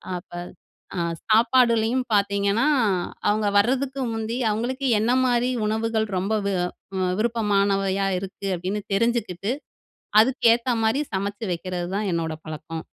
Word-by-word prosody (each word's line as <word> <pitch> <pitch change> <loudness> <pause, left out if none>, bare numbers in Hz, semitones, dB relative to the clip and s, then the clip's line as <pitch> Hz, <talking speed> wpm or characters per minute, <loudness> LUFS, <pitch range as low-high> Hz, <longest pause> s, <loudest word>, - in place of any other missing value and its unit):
அப்ப 180 +2 -8 0.7
அ - - 0 0.3
சாப்பாடுலேயும் 235 +1 +3
பார்த்தீங்கன்னா, 200 +2 +2 0.7
அவுங்க 210 0 +1
வரதுக்கு 260 +5 +1
முந்தி, 225 +1 -3
அவுங்களுக்கு 255 +6 -2
என்ன 230 +3 +1
மாரி 245 0 +2 0.2
உணவுகள் 220 0 0
ரொம்ப 195 +4 -1
வி 200 - 0
அ - - +1 0.5
விருப்பமானவையா 200 -4 +1
இருக்கு 195 +1 -7
அப்பிடீன்னு 185 +4 -3
தெரிஞ்சுக்கிட்டு, 220 -3 0 0.7
அதுக்கேத்த 235 0 +3
மாரி, 225 +6 +2
சமைச்சு 200 +3 -3
வைக்கிறதுதான் 185 +3 -3
என்னோட 165 -1 -1
பழக்கம். 155 +1 -6
215 Hz, 110 wpm, -24 LUFS, 195-235 Hz, 0.7 s, சாப்பாடுலேயும்